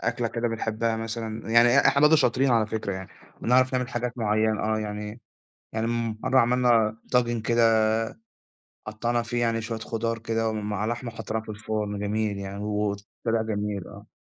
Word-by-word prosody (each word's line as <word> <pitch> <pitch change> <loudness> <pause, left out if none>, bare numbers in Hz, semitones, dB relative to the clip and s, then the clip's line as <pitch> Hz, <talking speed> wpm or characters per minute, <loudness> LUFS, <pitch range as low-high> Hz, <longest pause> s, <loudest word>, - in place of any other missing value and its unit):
أكلة 115 0 -1
كده 120 +1 -1
بنحبّها 115 0 -1
مثلًا. 110 0 -5
يعني 115 +1 +6
إ - - +5
إحنا 140 - +4
برضه 150 +1 +7
شاطرين 135 -1 +2
على 115 -3 +3
فكرة 110 -2 -3
يعني، 95 0 -6 0.3
بنعرف 130 +2 +3
نعمل 125 0 0
حاجات 125 0 -3
معيّنة، 110 0 +1
آه، 110 0 0
يعني 105 +1 -5 0.5
يعني 110 +1 -1
مرّة 115 +2 +1
عملنا 120 -3 +3
طاجن 120 -2 +2
كده 115 -1 +4 1.1
قطّعنا 115 +2 -1
فيه 120 0 -2
يعني 115 -1 +1
شوية 115 0 -4
خُضار 115 +1 -2
كده 115 0 -1
ومع 105 -1 -2
لحمة 120 +1 -3
وحطّيناها 110 0 -4
في - - -19
الفرن، 105 -1 -3
جميل 105 0 -1
يعني 100 0 -6
وطلع 105 +2 -2
جميل، 105 -3 -3
آه. - - -12
115 Hz, 165 wpm, -26 LUFS, 110-120 Hz, 1.1 s, برضه